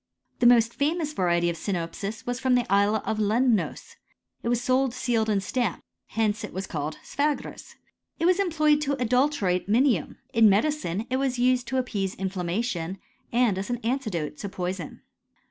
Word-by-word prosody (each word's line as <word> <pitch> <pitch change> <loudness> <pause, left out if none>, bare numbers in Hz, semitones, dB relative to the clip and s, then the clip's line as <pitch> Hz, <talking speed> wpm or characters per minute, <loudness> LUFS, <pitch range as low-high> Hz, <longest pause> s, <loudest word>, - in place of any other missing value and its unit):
The 240 - +5
most 235 -1 +5
famous 305 +1 -1
variety 175 -5 +1
of 170 - 0
sinopis 190 +4 -4
was 245 0 -2
from 255 0 +2
the 245 -1 +2
isle 205 +2 +3
of 220 - -1
Lemnos; 220 +1 0 0.4
it 235 - -2
was 240 -1 +2
sold 255 0 +1
sealed 230 -3 0
and 200 -2 +1
stamped: 240 -2 -1 0.2
hence 215 -1 -1
it - - -6
was 190 +1 -3
called 155 -1 -4
sphragis. 290 0 -3 0.4
It 330 - -1
was 365 +2 +4
em 395 -2 +2
ployed 305 -2 +3
to 285 -1 0
adulterate 245 -7 +1
minium. 235 - +2 0.2
In 225 -2 +6
medicine 215 - 0
it 260 - +2
wai 275 +1 +1
used 250 -1 +1
to 260 - -1
appease 205 -7 -2
infiammation, 185 0 -2 0.3
and 235 -5 +2
as 195 - -5
an 245 - -1
antidote 215 - -2
to 200 - -5
poison. 180 -3 -5
225 Hz, 170 wpm, -26 LUFS, 190-255 Hz, 0.4 s, In